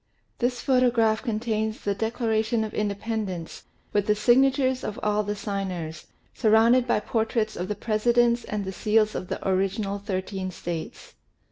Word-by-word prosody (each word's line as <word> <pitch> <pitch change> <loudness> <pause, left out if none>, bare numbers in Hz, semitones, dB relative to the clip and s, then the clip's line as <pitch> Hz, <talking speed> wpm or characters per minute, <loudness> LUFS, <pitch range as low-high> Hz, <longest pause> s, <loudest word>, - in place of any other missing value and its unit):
This 245 0 0
photograph 245 -4 +3
contains 220 -2 -2
the 200 - 0
Declaration 220 +1 0
of 215 - -5
Independence 205 -4 -3 0.3
with 205 -1 +1
the 210 - +4
signatures 260 +3 +3
of 210 - -4
all 210 0 +2
the 205 0 -3
signers, 185 -6 -4 0.3
surrounded 230 +3 +4
by 235 - +2
portraits 220 0 -1
of 180 - -3
the 210 - -2
Presidents 235 +3 +2
and 210 -2 -3
the 190 - -3
seals 215 +2 +2
of 180 - -4
the - - -4
original 195 +2 0
thirteen 190 -1 -3
States. 170 -2 -6
215 Hz, 145 wpm, -26 LUFS, 200-235 Hz, 0.3 s, the